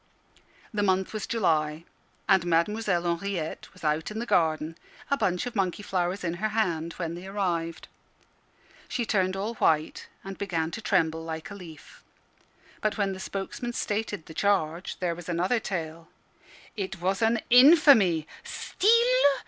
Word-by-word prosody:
The 210 - 0
month 190 0 +1
was 215 -2 -4
July; 155 -7 0 0.4
and 190 -3 +5
Mademoiselle 175 +2 +1
Henriette 170 -1 -3
was 185 - -18
out 155 +1 0
in 215 - -6
the 235 - -2
garden, 160 -5 +1 0.4
a - - +5
bunch 180 -8 0
of 245 - -6
monkey 195 0 -1
flowers 185 -1 -1
in 170 -1 -1
her 215 - +1
hand, 170 -7 -1
when 170 -2 -4
they 175 +2 -8
arrived. 175 -5 -2 1.0
She 240 - -2
turned 190 -3 +1
all 205 +4 -3
white, 155 -8 +1 0.2
and 195 0 -8
began 165 -5 -1
to 225 - -6
tremble 165 -6 +1
like 160 +2 -6
a - - -5
leaf. 175 -6 -12 0.8
But 215 +1 0
when 200 -2 0
the 190 - -8
spokesman 200 +6 -5
stated 205 -5 -2
the 160 - -11
charge, 180 -3 0
there 175 -2 -1
was 175 0 -9
another 180 +8 +1
tale. 165 -5 -5 0.7
"It 190 -3 -4
was 190 +4 0
an 225 +1 +3
infamy. 245 - +7 0.2
Steal! 405 - -1
185 Hz, 155 wpm, -27 LUFS, 165-210 Hz, 1.0 s, infamy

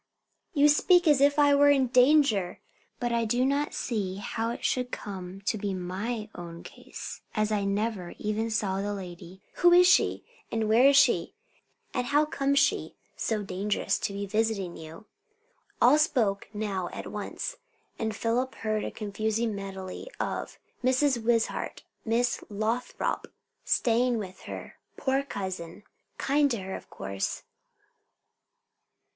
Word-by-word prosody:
"You 290 0 +6
speak 350 +4 +5
as 290 -3 +5
if 285 +1 +4
I 290 -1 +5
were 285 0 +6
in 275 -2 +4
danger! 250 -7 +3 0.4
But 240 -1 -1
I 235 0 +1
do 240 +3 +1
not 285 +2 0
see 200 -6 -2
how 225 +3 -3
it 235 - -5
should 250 -1 0
come 190 -1 -7
to 215 +1 -1
be 200 -1 -2
'my 205 +5 -3
own 170 -1 -8
case,' - - -9
as 215 -1 +1
I 205 -2 0
never 200 -2 -2
even 215 +2 -1
saw 200 -3 0
the 205 +1 -2
lady. 180 0 -9
Who 350 0 +6
is 355 +1 +8
she? 365 - +3 0.3
and 225 -1 0
where 230 +5 +6
is 280 0 +6
she? - - +3 0.6
and 250 0 -1
how 295 +3 +3
comes 280 -1 0
she 280 - +2 0.2
so 215 -2 -1
dangerous 200 +2 -1
to - - -2
be 200 0 -4
visiting 210 -3 -1
you?" 160 +6 -10 0.7
All 265 +5 +6
spoke 225 -10 +1
now 205 -4 -3
at - - -7
once, - - -5 0.4
and 220 -1 -2
Philip 245 +4 -1
heard 215 -1 -1
a - - -2
confused 215 +2 -2
medley 195 - -6
of - - -3 0.3
"Mrs. 255 -1 +2
Wishart" 230 0 0 0.2
"Miss 240 +2 +1
Lothrop" 220 +4 -2 0.3
"staying 240 +1 +2
with 190 -3 -6
her" - - -8 0.2
"poor 270 0 +1
cousin" 190 -7 -6 0.3
"kind 285 +1 +2
to 235 - -1
her 190 0 -6
of - - -10
course." 100 0 -4
220 Hz, 150 wpm, -28 LUFS, 200-260 Hz, 0.7 s, is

